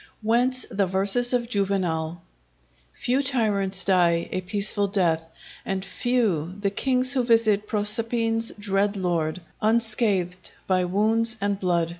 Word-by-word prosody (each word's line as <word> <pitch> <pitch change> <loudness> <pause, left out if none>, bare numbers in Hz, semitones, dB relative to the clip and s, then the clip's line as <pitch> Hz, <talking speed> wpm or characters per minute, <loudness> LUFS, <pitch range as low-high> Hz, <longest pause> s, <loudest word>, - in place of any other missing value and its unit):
Whence 245 +3 +1
the 195 -1 0
verses 200 +6 +2
of 245 -2 0
Juvenal:— 175 -6 -2 0.7
"Few 255 - -1
tyrants 205 -8 0
die 175 -3 +2
a 185 - -3
peaceful 200 +2 +1
death, 165 -5 0 0.3
and 195 0 -4
few 195 -9 -1
The 200 -1 -1
kings 255 +4 +2
who 255 -2 0
visit 220 -3 +2
Proserpine's 225 +2 +2
dread 205 0 -1
lord, 175 -2 -2 0.2
Unscathed 215 -5 +1 0.2
by 185 -1 0
wounds 225 +5 +2
and 200 -1 -2
blood." 175 -3 0
200 Hz, 125 wpm, -24 LUFS, 185-230 Hz, 0.7 s, verses